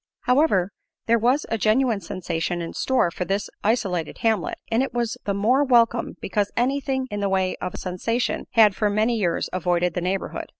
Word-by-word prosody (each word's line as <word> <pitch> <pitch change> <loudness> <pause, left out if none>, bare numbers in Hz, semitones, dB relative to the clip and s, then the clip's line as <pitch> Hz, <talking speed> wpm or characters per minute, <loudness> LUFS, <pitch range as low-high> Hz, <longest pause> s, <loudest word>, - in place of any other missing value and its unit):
However, 250 - +2 0.3
there 230 0 +3
was 250 +6 +2
a 225 - -1
genuine 220 0 +2
sensation 175 -1 -3
in 165 -1 -5
store 260 -10 +1
for 180 - -3
this 195 +2 -2
isolated 195 -7 -1
hamlet, 220 -5 0
and 225 +2 +3
it 265 -2 -3
was 235 -2 -1
the 200 - 0
more 240 +8 +3
welcome 235 -3 +2
because 205 +1 -1
anything 265 +1 0
in 205 - -3
the 200 -1 0
way 190 -1 0
of 180 - -5
a - - -6
sensation 230 +7 -2
had 215 -4 +5
for 210 - +1
many 215 +3 +1
years 180 -6 0
avoided 180 -1 0
the 180 - -2
neighborhood. 185 +2 -3
210 Hz, 185 wpm, -23 LUFS, 185-240 Hz, 0.3 s, had